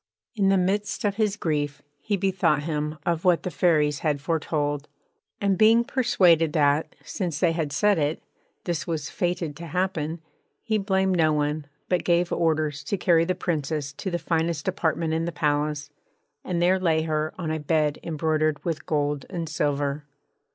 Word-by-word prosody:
In 200 -4 +2
the 195 - +4
midst 200 +4 0
of 200 0 0
his 210 -3 +1
grief 145 -5 -2 0.2
he 205 +7 -1
bethought 185 -6 +1
him 150 -1 -2
of 170 -1 0
what 180 -2 +3
the 180 - -3
Fairies 150 -5 +2
had 150 -3 0
foretold; 145 -1 -1 0.5
and 200 -1 +1
being 225 +2 +6
persuaded 180 - +3
that, 145 0 +2
since 170 -6 -3
they 175 -3 +3
had 160 -3 -2
said 200 +5 +2
it, 150 +2 0 0.4
this 170 -2 -3
was 160 -4 -3
fated 175 -4 -2
to 170 +1 -8
happen, 170 -2 -2 0.4
he 220 -2 0
blamed 190 -1 +1
no 160 -2 +4
one 150 0 -1 0.2
but 180 - +1
gave 175 0 +2
orders 155 -3 0
to 200 - -1
carry 170 -3 +3
the 185 +1 0
Princess 150 -5 -2
to 190 - -4
the 175 - -1
finest 165 -2 -1
apartment 165 -3 0
in 165 +1 0
the 170 - -2
palace, 150 -1 -1 0.5
and 175 -2 -1
there 185 +2 +3
lay 160 -3 +2
her 155 -1 -1
on 165 -4 -3
a 160 - -1
bed 150 -1 +1
embroidered 155 -1 -1
with 160 -3 -3
gold 145 -2 -1
and 170 -3 -4
silver. 145 0 -1
160 Hz, 170 wpm, -25 LUFS, 150-180 Hz, 0.5 s, being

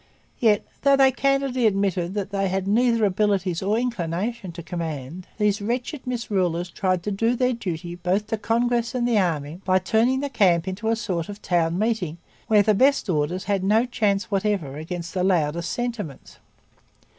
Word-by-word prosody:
Yet, 215 -4 +3 0.2
though 280 0 +5
they 270 -1 +5
candidly 275 -2 +1
admitted 195 -3 0
that 200 -1 -3
they 195 -1 0
had 190 0 -2
'neither 230 +1 +3
abilities 195 -3 +1
nor 205 +3 +1
inclination' 205 -2 -2
to 170 0 -8
command, 160 0 -5
these 210 0 +1
wretched 250 +6 -3
misrulers 185 -8 -1
tried 185 -3 0
to 210 - -2
do 225 +5 +1
their 250 +1 +1
duty 175 -6 -5
both 180 +4 0
to - - -30
the 225 - +1
Congress 235 +2 0
and 240 -1 +1
the 230 -3 +3
army 165 -2 -2
by 185 0 +3
turning 225 +7 +2
the 285 - -2
camp 180 -6 +3
into 200 +4 -2
a 225 - +3
sort 185 -7 -3
of 205 0 -7
town 170 -2 +1
meeting 210 -7 -1 0.3
where 215 -3 +5
the 215 - +3
best 260 -1 +3
orders 165 +4 -1
had 195 0 -1
no 215 +5 +3
chance 210 -5 0
whatever 195 -8 -1
against 170 +3 -6
the 185 -2 0
loudest 170 -2 +1
'sentiments.' 230 - -5
200 Hz, 180 wpm, -24 LUFS, 175-230 Hz, 0.3 s, though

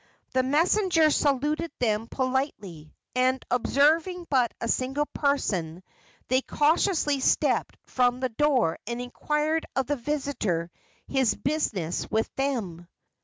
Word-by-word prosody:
The 260 - +2
messenger 325 +4 +3
saluted 295 +4 0
them 220 -2 0
politely, 255 - -3 0.2
and, 255 +1 +1
observing 315 +8 +2
but 250 -4 +3
a 230 - -3
single 265 +5 0
person, 190 - -1 0.4
they 260 +1 +2
cautiously 300 0 +1
stepped - - +1
from 250 -1 +1
the 255 0 -1
door 250 - +1
and 235 +1 -3
inquired 300 +5 -1
of 265 - +1
the 290 +3 -1
visitor 235 - -2 0.4
his 265 -5 +1
business 215 - -2
with 220 +1 -1
them. 215 -12 -3
265 Hz, 120 wpm, -26 LUFS, 230-295 Hz, 0.4 s, messenger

